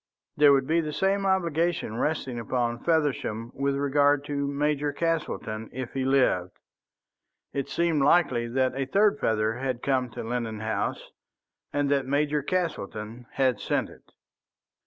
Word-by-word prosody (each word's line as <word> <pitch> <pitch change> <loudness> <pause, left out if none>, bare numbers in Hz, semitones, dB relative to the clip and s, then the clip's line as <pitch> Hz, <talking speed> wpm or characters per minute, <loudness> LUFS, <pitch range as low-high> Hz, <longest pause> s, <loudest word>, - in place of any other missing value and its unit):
There 145 -1 +6
would 135 -1 +3
be 165 +4 +2
the 155 -2 -4
same 195 +3 +1
obligation 170 - 0
resting 135 -5 -1
upon 120 +1 -1
Feversham 140 -8 0
with 140 0 0
regard 145 0 +2
to 140 -1 -2
Major 145 +1 0
Castleton 145 -9 -2
if 130 -1 -6
he 135 -1 -1
lived. 125 -10 +2 1.0
It 140 -1 -3
seemed 170 -3 +1
likely 135 -6 +3
that 130 +2 +1
a 135 0 -1
third 210 +6 +3
feather 110 - +1
had 130 -2 -3
come 130 -2 +1
to 110 - -7
Lennon 115 -2 -3
House, 110 0 -3 0.6
and 145 0 0
that 140 -2 +1
Major 145 +2 +1
Castleton 120 - -3
had 130 -2 +1
sent - - -1
it. - - -19
140 Hz, 145 wpm, -27 LUFS, 120-150 Hz, 1.0 s, There